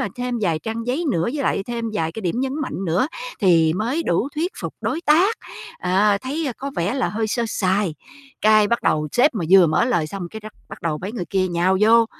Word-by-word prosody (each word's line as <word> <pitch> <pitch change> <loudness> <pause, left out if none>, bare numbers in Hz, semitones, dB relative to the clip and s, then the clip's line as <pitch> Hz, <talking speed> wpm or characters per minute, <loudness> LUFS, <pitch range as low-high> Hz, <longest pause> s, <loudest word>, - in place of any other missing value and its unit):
thêm 250 0 -3
vài 165 -6 +1
trang 225 +7 -4
giấy 275 +8 0
nữa, 165 - 0
với 275 +8 -2
lại 195 - 0
thêm 235 -1 -3
vài 165 -5 -1
cái 220 - -7
điểm 185 +7 -1
nhấn 265 0 -1
mạnh 195 -8 -4
nữa 175 - +1 0.3
thì 165 -5 +4
mới 240 - -1
đủ 175 +9 +1
thuyết 340 +5 -1
phục - - -5
đối 325 - -2
tác, 355 +8 +4 0.4
à, 200 +3 +2
thấy 290 +4 -3
có 275 +1 -5
vẻ 175 +6 0
là 265 - 0
hơi 220 +1 -2
sơ 235 +2 -1
sài. 190 -4 0 0.5
Cái, 215 -1 +5
bắt 235 - 0
đầu 150 0 +1
sếp 250 0 +3
mà 175 - -2
vừa 190 -3 +7
mở 155 +9 +2
lời 175 -11 0
xong 185 +1 -6
cái 220 - -8
rắc 215 0 -9 0.2
bắt - - -10
đầu 160 -3 -1
mấy 185 +6 -5
người 200 -7 -4
kia 185 +2 0
nhào 180 +2 +1
vô, 230 +1 +6
215 Hz, 230 wpm, -21 LUFS, 175-250 Hz, 0.5 s, vừa